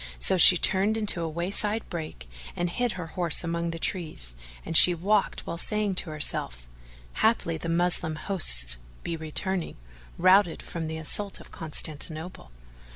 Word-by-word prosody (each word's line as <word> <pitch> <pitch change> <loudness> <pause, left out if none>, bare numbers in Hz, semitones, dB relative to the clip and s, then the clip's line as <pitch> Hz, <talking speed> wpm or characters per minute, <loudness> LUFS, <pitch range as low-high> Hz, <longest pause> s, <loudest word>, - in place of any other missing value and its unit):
So - - +1
she 180 0 +8
turned 195 +5 +3
into 210 -5 +5
a 165 - -3
wayside 200 +6 0
brake 155 - -7 0.3
and 175 0 -3
hid 245 +2 -2
her 180 -2 -7
horse 175 -3 +1
among 170 0 -3
the 165 - -5
trees 155 - -4 0.3
and 165 - -5
she 175 +2 +7
walked 200 +5 -1
a - - -20
while 170 - -7
saying 210 +1 -1
to 170 - -11
herself, 60 - -2 0.5
"Haply 170 -8 0
the 165 - -6
Moslem 165 -2 -1
hosts 60 - +2 0.3
be 170 - -4
returning, 165 +3 -2 0.4
routed, 185 0 +3
from 165 -2 -6
the 160 0 -6
assault 195 +6 -1
of - - -15
Constantinople." 155 - -4
170 Hz, 155 wpm, -26 LUFS, 160-190 Hz, 0.5 s, she